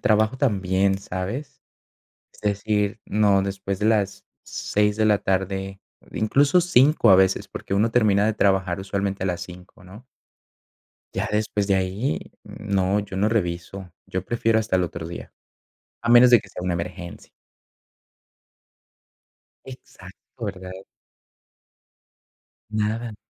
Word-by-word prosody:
trabajo 110 0 +2
también, 95 -6 +1
¿sabes? 100 +9 -6 0.7
Es - - -19
decir, 105 +1 -1
no, 100 -2 +3
después 95 0 -4
de 105 - 0
las 100 -3 0 0.2
6 105 0 -1
de 110 - +2
la 105 -1 +4
tarde, 95 0 -2 0.3
incluso 140 +10 +3
5 145 -6 +4
a 95 - +9
veces, 95 0 +2
porque - - -6
uno 105 +3 +2
termina 105 -4 +3
de 110 - +1
trabajar 95 -3 +1
usualmente 100 0 -3
a - - -1
las 90 -2 -2
5, 90 +4 -12
¿no? 100 +7 -14 1.1
Ya - - -1
después 105 -1 0
de 100 - +2
ahí 95 +8 -1 0.2
no, 100 -1 -1
yo 100 -2 -8
no 100 +3 +2
reviso, 90 -2 -3 0.2
yo 95 0 -4
prefiero 115 0 +1
hasta 110 -3 0
el 90 - +1
otro 85 -1 -6
día, 85 - -9 0.7
a 120 - -2
menos 120 +1 +7
de 120 - +8
que 100 - -16
sea - - -8
una 90 -1 -1
emergencia. 85 +1 -6 2.4
Exacto, 120 -2 -12
¿verdad? 95 -2 -6 2.0
Nada, 110 +2 -2
100 Hz, 130 wpm, -23 LUFS, 95-110 Hz, 2.4 s, a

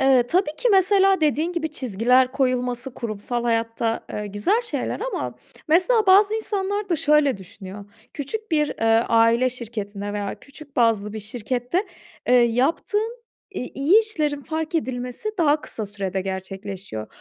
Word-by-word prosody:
Eee, 265 -2 +5
tabii 335 +1 0
ki - - +2
mesela 390 -1 +4
dediğin 310 +3 +1
gibi, 320 -2 -2
çizgiler 250 +1 +2
koyulması 250 -1 -1
kurumsal 235 +2 -4
hayatta, 230 0 0
eee, 210 0 -4
güzel 205 - +1
şeyler 480 - -3
ama - - -3 0.3
mesela 405 +7 +3
bazı 405 +3 +6
insanlar 410 -2 -2
da 340 - +1
şöyle 295 -4 +3
düşünüyor: 195 +1 -10 0.3
Küçük 415 +10 -5
bir, 300 -2 +2
eee, 225 +1 +2
aile 230 +2 +4
şirketinde 205 -4 -5
veya 205 -1 -4
küçük 285 0 -15
bazlı 220 -3 +2
bir 220 - -5
şirkette, 245 - -2 0.4
eee, 250 - +5
yaptığın 330 - +1 0.3
i 395 - -5
iyi 315 +11 +5
işlerin 305 -10 -2
fark 320 +2 -4
edilmesi 255 - -2
daha 305 -2 +3
kısa 215 -2 -5
sürede 195 -1 -3
gerçekleşiyor. 190 - -6
255 Hz, 145 wpm, -23 LUFS, 225-340 Hz, 0.4 s, bazı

